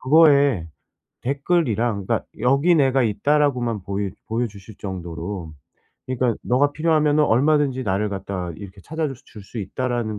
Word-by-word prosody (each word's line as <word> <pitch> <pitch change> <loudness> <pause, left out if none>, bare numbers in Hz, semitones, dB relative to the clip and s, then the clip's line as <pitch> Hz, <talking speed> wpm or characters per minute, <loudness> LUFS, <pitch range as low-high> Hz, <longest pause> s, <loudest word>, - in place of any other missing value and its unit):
그거에 140 - +4 0.5
댓글이랑 120 - 0
그러니까 - - 0 0.2
'여기 140 +8 +4
내가 135 -3 +3
있다.'라고만 120 0 +1
보이 100 +1 -3 0.2
보여 115 +2 0
주실 100 0 -13
정도로. 90 -2 -6 0.5
그니까 125 -2 0
'너가 140 +4 +2
필요하면은 155 -1 +3
얼마든지 140 +1 +2
나를 100 +1 0
갖다 95 -2 -4
이렇게 100 -1 -10
찾아줄 155 - -3 0.3
수 100 +5 -13
있다.'라는 110 +1 -2
120 Hz, 340 characters per minute, -22 LUFS, 100-145 Hz, 0.5 s, 그거에